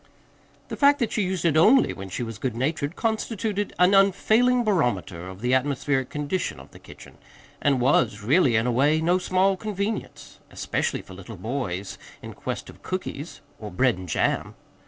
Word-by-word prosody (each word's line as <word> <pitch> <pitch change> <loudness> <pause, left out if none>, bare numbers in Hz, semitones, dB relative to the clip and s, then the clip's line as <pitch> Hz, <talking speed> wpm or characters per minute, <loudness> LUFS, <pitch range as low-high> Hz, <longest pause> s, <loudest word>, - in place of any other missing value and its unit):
The - - -4
fact 285 0 +5
that 235 -5 -1
she 215 - 0
used 185 -2 -2
it 160 -3 +3
ONLY 225 +12 +5
when 95 0 -8
she 110 - -4
was 115 -3 -7
good 125 -4 -2
natured 145 +5 -2
constituted 220 -2 -2
an 180 +2 +4
unfailing 220 +6 +4
barometer 105 - -1
of 95 +1 -11
the 125 +1 0
atmospheric 130 0 0
condition 150 +5 -3
of - - -14
the - - -14
kitchen, - - -15 0.4
and 140 -3 +2
was 120 -4 +2
really, 135 - +3
in 110 +1 +2
a 125 - +1
way, 145 +6 +3
no 175 +3 +2
small 185 +2 +2
convenience 205 +1 -5
especially - - -2
for 95 - -13
little 100 +3 -10
boys 100 -3 -4 0.2
in - - -8
quest - - -5
of - - -14
cookies 175 -4 -6 0.2
or 105 - -7
bread 125 +6 +2
and 90 -1 -9
jam. - - -1
145 Hz, 180 wpm, -24 LUFS, 120-195 Hz, 0.4 s, fact